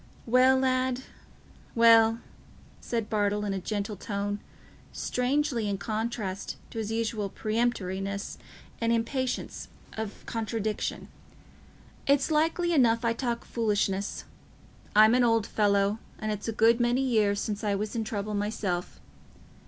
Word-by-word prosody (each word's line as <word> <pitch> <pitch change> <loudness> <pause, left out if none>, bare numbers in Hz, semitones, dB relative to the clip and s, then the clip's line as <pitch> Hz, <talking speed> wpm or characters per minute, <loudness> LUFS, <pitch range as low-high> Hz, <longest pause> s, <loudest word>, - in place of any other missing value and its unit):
"Well, 255 +2 +5
lad, 260 -1 +1 0.7
well," 230 -1 +6 0.6
said 230 -3 -2
Bartle, 210 -1 0
in 200 - -1
a 195 - -2
gentle 205 +2 -3
tone, 205 +1 -3 0.5
strangely 250 -3 0
in 200 - -1
contrast 215 -2 -3
with - - -14
his 220 -2 -3
usual 225 -2 -1
peremptoriness 200 -3 -2 0.4
and 230 0 +2
impatience 245 +3 -2 0.3
of 220 -2 -6
contradiction, 220 -1 -3 1.0
"it's 280 +2 +3
likely 330 +3 +2
enough 235 -5 +3
I 230 - +3
talk 235 -1 -3
foolishness. 205 -3 -1 0.7
I'm 215 +2 +7
an 250 0 +4
old 230 -3 +3
fellow, 205 0 +2 0.2
and 215 0 -3
it's 210 +1 -4
a - - 0
good 225 +2 +4
many 240 +2 +2
years 215 -6 +2
since 210 0 -3
I 205 -1 +1
was 210 +3 -3
in 225 - 0
trouble 210 -1 -3
myself. 205 -4 -2
225 Hz, 130 wpm, -28 LUFS, 205-240 Hz, 1.0 s, I'm